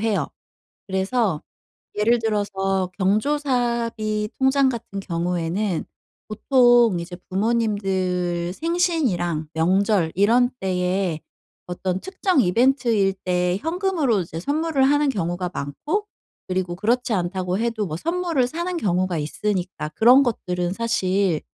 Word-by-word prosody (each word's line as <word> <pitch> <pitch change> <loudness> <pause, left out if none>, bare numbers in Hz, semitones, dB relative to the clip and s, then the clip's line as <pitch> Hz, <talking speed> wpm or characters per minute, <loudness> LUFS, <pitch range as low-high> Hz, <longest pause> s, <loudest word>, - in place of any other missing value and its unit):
해요. 220 -2 0 0.6
그래서 190 -2 0 0.5
예를 230 +3 +3
들어서 195 -4 -1
경조사비 230 -1 0
통장 265 0 +3
같은 225 -5 -5
경우에는 175 +1 -2 0.4
보통 240 -2 +4
이제 175 +1 -7
부모님들 190 -5 0
생신이랑 260 - 0
명절 185 +1 +2
이런 235 +6 +3
때에 180 -3 -1 0.5
어떤 180 +1 -3
특정 375 -3 0
이벤트일 230 -2 +2
때 180 0 +1
현금으로 325 - 0
이제 165 -1 -5
선물을 295 - 0
하는 290 +1 +3
경우가 175 -3 -2
많고 295 - -3 0.4
그리고 185 -1 -2
그렇지 235 +4 0
않다고 185 0 -1
해도 225 -3 -1
뭐 155 -1 -4
선물을 335 - 0
사는 345 +6 -3
경우가 185 - 0
있으니까 180 0 -3
그런 245 - +6
것들은 180 -7 -2
사실 195 -7 0
205 Hz, 265 characters per minute, -22 LUFS, 180-245 Hz, 0.6 s, 그런